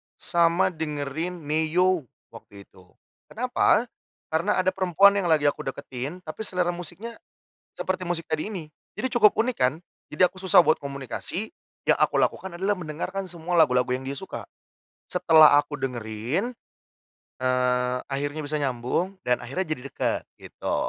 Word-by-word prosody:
sama 170 +1 +2
dengerin 160 +2 -4
Ne-Yo 160 +1 +1 0.2
waktu 100 0 -13
itu. 95 -2 -21 0.4
Kenapa? 240 -1 +2 0.5
Karena 170 +6 +1
ada 185 - +2
perempuan 190 +1 +5
yang 185 - -1
lagi 160 -3 +3
aku 145 -2 0
deketin, 135 +6 -6
tapi 175 +7 -6
selera 180 -1 0
musiknya 180 - -7 0.6
seperti 185 -1 -2
musik 170 -1 -2
tadi 155 +3 -2
ini. 170 -8 -7 0.2
Jadi 260 - -2
cukup 215 -4 +5
unik 240 +2 +1
kan? 130 +3 +3 0.3
Jadi 155 +5 +3
aku 185 +1 -1
susah 185 -2 +6
buat 155 - +3
komunikasi. 140 - -4 0.3
Yang - - +3
aku - - +3
lakukan 190 -2 0
adalah 195 +4 +1
mendengarkan 180 +4 -4
semua 170 0 0
lagu-lagu 125 -4 +3
yang 130 +1 -3
dia 140 - -3
suka. 190 - -7 0.6
Setelah 160 -4 +6
aku 145 0 0
dengerin, 125 - -2 0.9
eee, 125 0 +1
akhirnya 145 +3 -2
bisa 150 +1 -2
nyambung 135 +7 -1
dan 125 0 +1
akhirnya 150 +10 -3
jadi 155 -5 -2
deket, - - -2
gitu. - - -5
160 Hz, 145 wpm, -25 LUFS, 135-185 Hz, 0.9 s, susah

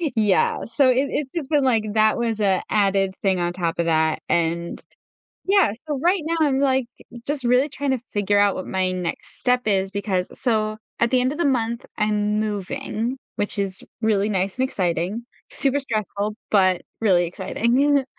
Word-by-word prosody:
Yeah. 210 -3 +2
So 255 +3 +3
it 250 - +4 0.2
it's 285 -3 -2
just 310 -4 -3
been 295 -3 +3
like 230 -5 +3
that 215 +1 +4
was 230 -2 -1
a 190 -3 +2
added 195 -2 +2
thing 190 -2 +1
on 175 0 -1
top 170 -2 -2
of 170 - +1
that, 160 -1 +1
and 170 0 0 0.7
yeah, 395 - +4 0.2
so 295 -2 -2
right 360 0 +2
now, 330 +1 0
I'm, 280 -3 +2
like, 265 -3 +2 0.4
just 285 -2 -3
really 250 +4 +3
trying 280 -1 -2
to 255 - -1
figure 205 0 +1
out 205 -1 +3
what 185 - -5
my 185 -1 0
next 180 -2 -5
step 250 -2 +1
is 195 0 +1
because 195 -3 -1
so 215 -3 0 0.2
at 235 - +2
the 255 - +4
end 255 +1 +1
of 300 - -7
the 345 - +1
month, 235 -4 0
I'm 210 0 +1
moving, 220 +3 -3 0.2
which 205 - -2
is 190 -1 -3 0.2
really 210 -2 +2
nice 195 0 -1
and 260 - +2
exciting. 185 +4 -2 0.3
Super 285 - +1
stressful, 215 -5 -3 0.2
but 185 -3 +3 0.2
really 185 -6 +3
exciting. 250 +10 +1
215 Hz, 180 wpm, -22 LUFS, 190-260 Hz, 0.7 s, it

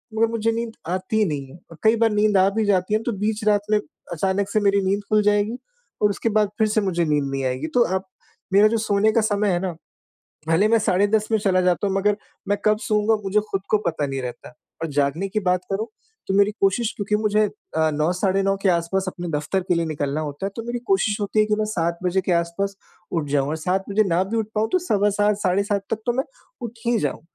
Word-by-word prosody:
मगर 225 +1 +3
मुझे 225 0 0
नींद 230 0 -3
आती 185 +4 -2
ही 215 - +4
नहीं 145 -5 -3
है 155 - -13
और 165 - -12
कई 220 +1 +5
बार 225 0 +3
नींद 210 -1 +3
आ 190 +1 +5
भी 220 -1 +1
जाती 190 0 +1
है, 215 - +2
तो 240 - -1
बीच 210 +1 -2
रात 205 -1 +4
में 210 - +4 0.3
अचानक 195 +4 0
से 215 - +1
मेरी 200 0 +3
नींद 200 +2 0
खुल 215 0 +4
जाएगी 210 +3 +1 0.4
और 210 - +4
उसके 205 +3 -1
बाद 210 -1 +2
फिर 220 -1 +3
से 215 0 +1
मुझे 175 -4 0
नींद 150 -2 +1
नहीं 135 -1 -2
आएगी। 130 +4 -2
तो 240 - +6
आप 190 0 -2 0.5
मेरा 205 +2 +7
जो 230 +1 +1
सोने 215 0 +2
का 230 - +2
समय 210 -1 +1
है 175 - +1
ना, 185 -1 -2 0.8
भले 185 +6 +3
मैं 230 0 +4
साढ़े 200 -1 +2
10 215 0 +1
में 220 - +4
चला 190 -2 +2
जाता 180 +2 +1
हूँ 195 - -1
मगर 205 +1 +2 0.3
मैं 205 0 +1
कब 215 0 +3
सोऊँगा? 215 0 +2
मुझे 200 +2 +2
खुद 195 -1 -1
को 215 - +4
पता 155 -3 0
नहीं 135 -1 -4
रहता 125 +4 -7 0.3
और 165 - -1
जागने 145 +7 0
की 215 +2 -1
बात 180 0 +2
करूँ 215 +3 -1 0.4
तो 195 - 0
मेरी 200 +1 +5
कोशिश 205 +4 +2
क्योंकि 210 0 0
मुझे 215 0 +1 0.4
अ, 160 0 +3
9 155 +3 +1
साढ़े 195 +1 +1
9 195 0 +1
के 195 - +3
आस-पास 175 +2 +1
अपने 175 -1 -5
दफ़्तर 160 +5 -1
के 175 - +3
लिए 170 0 0
निकलना 145 -1 -2
होता 150 +5 -4
है, - - -3
तो 230 - -4
मेरी 240 0 -2
कोशिश 200 +2 +1
होती 205 +1 +1
है 215 - +3
कि 210 - +1
मैं 215 - +1
7 170 -4 -1
बजे 180 +1 +1
के 180 - +2
आस-पास 170 +4 -1 0.4
उठ 160 -4 -1
जाऊँ 140 -1 +1
और 155 - -2
7 185 +4 -1
बजे 215 +2 +3
ना 175 +2 +2
भी 225 +4 -3
उठ 220 -2 0
पाऊँ, 215 +1 +1
तो 370 - +4
सवा 210 - +1
7 205 0 +1
साढ़े 190 0 +1
7 200 -1 -1
तक 225 - +1
तो 240 - +2
मैं 265 - +1 0.4
उठ 235 0 -6
ही 235 -1 +2
जाऊँ - - -2
200 Hz, 250 wpm, -22 LUFS, 175-215 Hz, 0.8 s, मेरा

